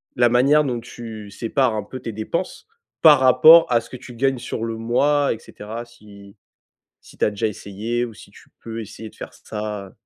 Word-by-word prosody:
la 120 0 +4
manière 135 +6 +4
dont 125 -4 -2
tu 115 -3 -9
sépares 120 +3 0
un 105 - -3
peu 130 +6 -9
tes 115 - -6
dépenses? 110 - -4 0.3
Par 150 -4 +8
rapport 130 +6 +7
à 120 -1 +3
ce 115 - -16
que 125 - -7
tu 125 - -12
gagnes 135 +1 0
sur 120 -2 -5
le 115 -1 -4
mois 140 +5 +1
et - - -8
cetera 115 +2 -9
si 100 -4 -16 0.7
si - - -18
tu - - +1
as - - +2
déjà 105 +1 -2
essayé 110 +3 -3
ou 120 - -8
si - - -15
tu - - -19
peux 115 0 -6
essayer 110 +1 -9
de - - -23
faire - - -9
ça? 105 -2 -7
115 Hz, 210 wpm, -21 LUFS, 110-130 Hz, 0.7 s, Par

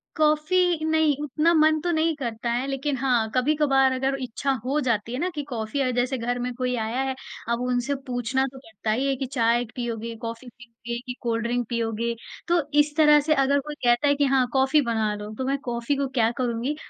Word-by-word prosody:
Coffee, 315 +2 +2
नहीं, 315 -2 +3
उतना 300 +4 +2
मन 310 -1 +4
तो 350 +2 0
नहीं 320 0 +1
करता 235 -3 -3
है। 245 +2 0
लेकिन 275 +1 -1
हाँ, 245 -4 +1
कभी-कभार 270 0 +3
अगर 265 +1 0
इच्छा 255 +2 -2
हो 280 +4 +1
जाती 235 -3 -1
है 255 - -3
ना 360 - 0
कि 295 - -3
कॉफ़ी 225 +1 -3
अ, 255 - +1
जैसे 250 +2 0
घर 245 +1 -2
में 250 0 -3
कोई 250 0 -1
आया 230 +3 -1
है, 265 0 -2 0.3
अब 235 +1 0
उनसे 250 +2 0
पूछना 250 +2 0
तो 265 - -12
पड़ता 220 -3 -5
ही 255 +5 0
है 275 - +1
कि 265 - -3
चाय 240 -2 +1
पियोगे, 230 -2 -4
कॉफ़ी 230 +2 -7
पियोगे, 235 0 -8
कि 250 - -4
कोल्ड 230 -1 -1
ड्रिंक 240 0 -1
पियोगे। 235 0 -1 0.3
तो 345 0 +3 0.2
इस 295 0 +2
तरह 300 -1 +7
से 310 +2 +2
अगर 280 0 +3
कोई 295 +2 -6
कहता 240 +4 +4
है 285 - +4
कि, 285 0 +2
"हाँ, 265 -2 +3
कॉफ़ी 270 +3 +4
बना 220 -4 0
लो।" 210 0 -7
तो 260 - -2
मैं 275 +1 0
कॉफ़ी 235 +3 -1
को 280 0 -1
क्या 225 -1 +4
करूँगी 245 +3 -1
255 Hz, 215 wpm, -25 LUFS, 235-285 Hz, 0.3 s, तरह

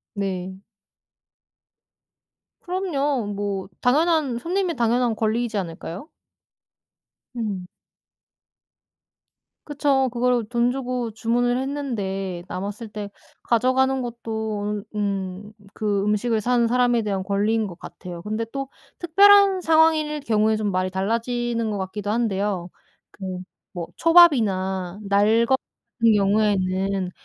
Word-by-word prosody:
네. 190 -2 -3 2.1
그럼요. 295 - -1
뭐 200 -2 -3
당연한, 295 -1 +2
손님의 355 +3 -1
당연한 240 0 +2
권리이지 225 +1 -1
않을까요? 175 - -6 1.3
음. 200 -6 -3 2.0
그쵸. 280 -3 +1
그거를 245 -1 +1
돈 240 0 +2
주고 250 -2 -3
주문을 245 +3 0
했는데 200 -10 -3
남았을 205 +4 -5
때 210 -1 -7 0.3
가져가는 260 +3 +2
것도 220 -3 -4
으 210 - -3
음 195 0 -3 0.2
그 205 -2 -1
음식을 215 +2 +1
산 245 0 +2
사람에 245 -1 +3
대한 200 -3 -2
권리인 210 +3 0
것 175 -3 -9
같아요. 175 -1 -9
근데 215 +3 -2
또 275 -1 -4 0.3
특별한 395 +2 +6
상황일 315 -2 +3
경우에 220 -4 +2
좀 215 -1 -1
말이 185 0 -1
달라지는 230 +3 -1
것 205 - -3
같기도 200 +2 -4
한데요. 200 -5 -1 0.4
그 185 -2 -6 0.4
뭐 170 -1 -4
초밥이나 205 - +4
날 210 +4 +3
것 265 +2 +3 0.4
같은 230 -1 +5
경우에는 195 -2 +1
220 Hz, 235 characters per minute, -23 LUFS, 200-250 Hz, 2.1 s, 특별한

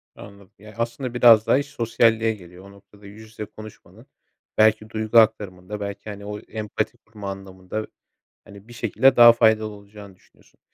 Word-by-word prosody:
Anladım, 100 -2 -15
yani, 105 +1 -15
aslında 120 +2 -4
biraz 115 -3 +5
daha - - +4
iş 140 - -2
sosyalliğe 115 -2 +1
geliyor 90 -1 -15
o 100 - -14
noktada. 100 +1 -20
Yüz 105 +2 -13
yüze 110 -1 -9
konuşmanın 110 +1 -15 0.5
belki 110 0 +3
duygu 110 +1 -1
aktarımında 105 -3 -1
belki, 100 +1 -7
hani, 100 -1 -9
o 105 0 -6
empati 105 -1 -5
kurma 105 -2 -10
anlamında, 95 +2 -8 0.6
hani, 100 +1 -15
bir 120 - -13
şekilde 120 +3 +2
daha 120 -1 +8
faydalı 110 -2 +2
olacağını 100 -1 -14
düşünüyorsun. 90 - -29
110 Hz, 160 wpm, -22 LUFS, 100-110 Hz, 0.6 s, daha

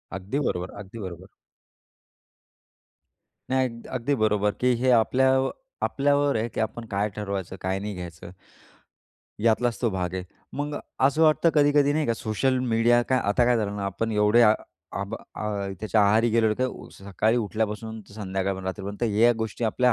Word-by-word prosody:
अगदी 95 +9 -3
बरोबर, 90 -10 -2
अगदी 100 +3 -9
बरोबर. 95 -5 -7 2.2
नाही, 130 0 +2
अग 115 -1 -11
अगदी 130 +4 0
बरोबर, 105 -1 +2
की 125 +4 +1
हे 130 - +3
आपल्या 125 +3 +4 0.6
आपल्यावर 145 0 +2
आहे, 110 +1 -1
की - - -6
आपण 115 +1 -2
काय 100 +2 +1
ठरवायचं 100 -3 -4
काय 95 +1 -1
नाही 105 +1 -4
घ्यायचं. 85 -1 -8 1.1
यातलाच 115 +1 +2
तो 115 - +1
भाग 90 -2 -3
आहे. 95 -1 -3 0.3
मग 145 +1 -3 0.3
असं 140 +4 +1
वाटतं 160 +1 +4
कधी-कधी 145 -1 +4
नाही 155 0 0
का 115 - +1
सोशल 120 +4 0
मीडिया 120 -1 +3
काय 130 - +3
आता 105 +4 +3
काय 120 0 +3
झालं 105 -2 -2
ना, 100 - -3
आपण 100 +4 -2
एवढे 105 +2 +4
आ 110 -1 +6 0.5
आबा 100 +3 -4 0.3
आह 100 -2 -2
त्याच्या 110 0 +2
आहारी 110 +3 +4
गेलेलो, 110 -1 +3
ते 130 - +2
उ 130 - -6
सकाळी 100 +4 0
उठल्यापासून 110 0 -2
ते 100 - -17
संध्याकाळपर्यंत 95 -2 -3
रात्रीपर्यंत 100 +3 -5 0.2
या 120 +2 +6
गोष्टी 110 +1 -3
आपल्या 125 +3 +3
110 Hz, 165 wpm, -25 LUFS, 100-125 Hz, 2.2 s, आ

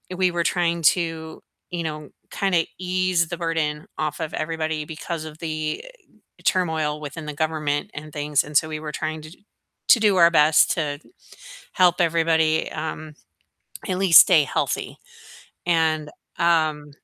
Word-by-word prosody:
we 185 -1 +2
were 170 -1 -1
trying 170 -1 0
to, 160 0 0 0.3
you 175 -2 -4
know, 155 -2 -6 0.2
kinda 180 -5 +1
ease 185 -1 0
the 175 - -4
burden 160 -3 -2
off 155 0 -3
of 155 - -4
everybody 155 -1 -3
because 160 0 -6
of 155 0 -10
the 155 - -3 0.6
turmoil 160 -5 0
within 150 +1 -7
the 150 - -4
government 155 0 -1
and 150 0 -8
things, 145 -1 0
and, 150 0 -7
so, 160 - -2
we 155 -1 -5
were 155 -1 -6
trying 155 +1 -4
to 155 - -11 0.6
to 235 - +6
do 210 -3 +3
our 170 -1 +6
best 155 -1 +4
to 145 -3 -2 0.7
help 180 -1 +3
everybody, 160 -1 +2
um, 155 0 -6 0.7
at 185 -1 -1
least 190 -4 +8
stay 160 -5 +4
healthy, - - -2 0.7
and, 160 -3 +1 0.3
um 155 -4 +1
160 Hz, 150 wpm, -23 LUFS, 155-170 Hz, 0.7 s, least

